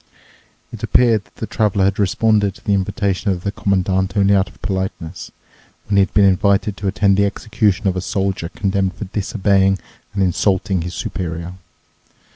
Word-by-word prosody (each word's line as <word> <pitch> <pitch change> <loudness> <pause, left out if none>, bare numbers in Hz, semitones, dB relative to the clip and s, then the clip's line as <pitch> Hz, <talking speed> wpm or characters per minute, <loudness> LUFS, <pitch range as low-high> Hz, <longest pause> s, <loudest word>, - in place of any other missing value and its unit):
It - - -8
appeared 115 -4 +3
that - - -29
the - - -4
Traveler 105 -3 0
had 100 +1 0
responded 105 0 +2
to - - -18
the 100 - +2
invitation 100 +1 -1
of 90 -2 -2
the 100 - -1
Commandant 95 -1 0
only 100 0 +4
out 95 0 +2
of - - -21
politeness, 95 -4 -4 0.6
when 100 - -1
he - - +5
had 95 - +2
been 100 - +6
invited 100 +1 +2
to 100 - -3
attend 100 0 +2
the 100 - +4
execution 105 -1 0
of 95 - +1
a 90 - -2
soldier 95 -4 -2
condemned 95 -1 -1
for 105 - -6
disobeying 95 -1 +1 0.4
and 100 - +2
insulting 95 0 +1
his 85 +1 -5
superior. 85 0 -4
100 Hz, 175 wpm, -19 LUFS, 95-100 Hz, 0.6 s, been